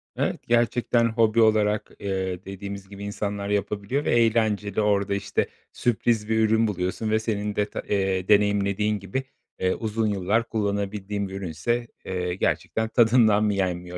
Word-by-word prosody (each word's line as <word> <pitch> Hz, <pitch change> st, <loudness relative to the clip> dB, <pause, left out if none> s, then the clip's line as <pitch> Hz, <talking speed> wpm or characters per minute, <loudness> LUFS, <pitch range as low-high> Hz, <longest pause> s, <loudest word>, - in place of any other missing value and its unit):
Evet, -, -, -1 dB
gerçekten 120 Hz, 0 st, +2 dB
hobi 115 Hz, 0 st, +3 dB
olarak, 105 Hz, -1 st, +2 dB
eee, 95 Hz, -2 st, -3 dB
dediğimiz 100 Hz, 0 st, -7 dB
gibi 100 Hz, 0 st, -9 dB
insanlar 100 Hz, 0 st, -3 dB
yapabiliyor 105 Hz, +6 st, -1 dB
ve -, -, +1 dB
eğlenceli 110 Hz, -3 st, +2 dB
orada, 100 Hz, -1 st, +1 dB
işte, 100 Hz, -, -1 dB, 0.3 s
sürpriz 115 Hz, -1 st, 0 dB
bir 110 Hz, 0 st, +2 dB
ürün 110 Hz, +1 st, +3 dB
buluyorsun 95 Hz, +2 st, -2 dB
ve 110 Hz, -, +3 dB
senin 105 Hz, -2 st, -2 dB
deta 105 Hz, 0 st, -2 dB
eee, 95 Hz, -2 st, 0 dB
deneyimlediğin 105 Hz, 0 st, +2 dB
gibi, 100 Hz, +8 st, -3 dB, 0.4 s
eee, 95 Hz, 0 st, +1 dB
uzun 110 Hz, -1 st, -1 dB
yıllar 105 Hz, +3 st, 0 dB
kullanabildiğin 100 Hz, -1 st, -2 dB
bir 95 Hz, -, -9 dB
ürünse, 100 Hz, +6 st, -2 dB, 0.2 s
eee, 90 Hz, -1 st, -2 dB
gerçekten 110 Hz, +3 st, -1 dB
tadından 115 Hz, -3 st, +4 dB
mı 105 Hz, -1 st, +2 dB
yenmiyor 90 Hz, -2 st, -2 dB
105 Hz, 145 wpm, -25 LUFS, 100-110 Hz, 0.4 s, tadından